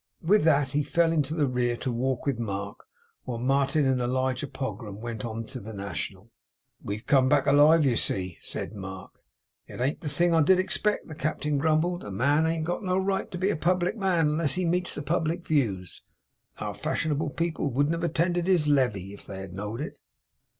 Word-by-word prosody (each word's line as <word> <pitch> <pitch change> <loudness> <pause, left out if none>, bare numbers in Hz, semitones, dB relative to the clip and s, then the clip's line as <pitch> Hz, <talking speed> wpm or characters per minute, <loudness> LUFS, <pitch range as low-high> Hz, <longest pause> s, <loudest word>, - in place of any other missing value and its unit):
With 195 +1 +4
that, 145 -4 +4
he 145 +2 +1
fell 165 +3 +2
into 155 -1 0
the 150 -3 +2
rear 125 -2 0
to 130 - -3
walk 125 +1 -1
with 135 -5 0
Mark, 100 -2 -4 0.4
while 120 -2 -3
Martin 140 +4 +2
and 130 -1 +2
Elijah 130 +2 0
Pogram 125 -6 -6
went 115 -1 -5
on 115 -1 -4
to - - -7
the 110 +3 -9
National. 100 +2 -5 0.5
'We've 105 +2 -5
come 130 -2 +4
back 140 -1 +3
alive, 150 +2 +6
you 125 -3 +3
see!' 90 -5 -1
said - - -4
Mark. 95 -2 -8 0.6
'It - - -10
ain't 135 +5 -1
the 150 - -3
thing 170 +4 +2
I 165 - +5
did 185 +5 +5
expect,' 205 +3 0
the 160 - -8
Captain 150 -1 -1
grumbled. 160 +4 +1
'A - - -7
man 140 +10 +2
ain't 160 -1 -1
got 175 +1 -2
no 185 -2 0
right 190 0 0
to 180 - -6
be 190 +3 +1
a - - -1
public 180 +4 +1
man, 190 -6 +2
unless 150 -1 +1
he 185 0 0
meets 175 +1 +1
the 145 - -4
public 165 +2 -1
views. 105 - -1 0.6
Our - - -4
fashionable 150 -1 -2
people 165 -4 -1
wouldn't 145 +5 +1
have 165 0 -3
attended 175 +1 0
his 175 -6 +3
le 135 -4 +4
vee, 100 -2 -8
if 100 - -13
they 95 -1 -6
had 95 -2 -8
know'd 105 +6 -5
it. 150 - -6
145 Hz, 205 wpm, -27 LUFS, 120-165 Hz, 0.6 s, alive